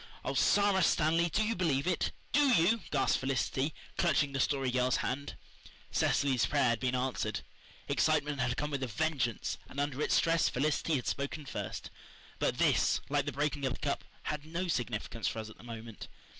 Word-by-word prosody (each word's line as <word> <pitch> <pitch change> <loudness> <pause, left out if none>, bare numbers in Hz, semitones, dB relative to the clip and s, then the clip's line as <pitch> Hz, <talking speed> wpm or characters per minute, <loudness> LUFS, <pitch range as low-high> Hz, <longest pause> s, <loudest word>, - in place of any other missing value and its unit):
"Oh, - - -1
Sara 200 -2 +4
Stanley, 165 +1 +3
do 210 +7 +1
you 220 +2 0
believe 160 -6 +1
it? 180 -2 0 0.2
DO 290 - +4
you?" 200 +6 +4
gasped - - +2
Felicity, 135 +2 0 0.3
clutching 145 -4 +3
the 135 - -2
Story 135 -1 +1
Girl's 125 0 +2
hand. 140 +3 -3 0.6
Cecily's 130 -4 +2
prayer 140 -4 +3
had 120 -1 +1
been 130 -1 0
answered. 125 0 -1 0.5
Excitement 150 -2 +1
had 125 0 0
come 150 +1 -2
with 140 -2 -2
a 130 - -1
vengeance, 130 -3 -1
and 140 - -6
under 145 0 -1
its - - +2
stress 165 -1 +3
Felicity 150 +4 0
had 125 - -2
spoken 145 +1 -3
first. - - -5 0.5
But - - 0
this, - - +3
like 145 0 +1
the - - 0
breaking 145 0 -1
of 130 - -1
the - - -9
cup, 140 - -1 0.2
had 150 -1 -3
no 170 +4 -3
significance 115 -6 -2
for - - -2
us 110 -1 -5
at - - -15
the - - -14
moment. 115 -2 -8
140 Hz, 185 wpm, -32 LUFS, 130-155 Hz, 0.6 s, Sara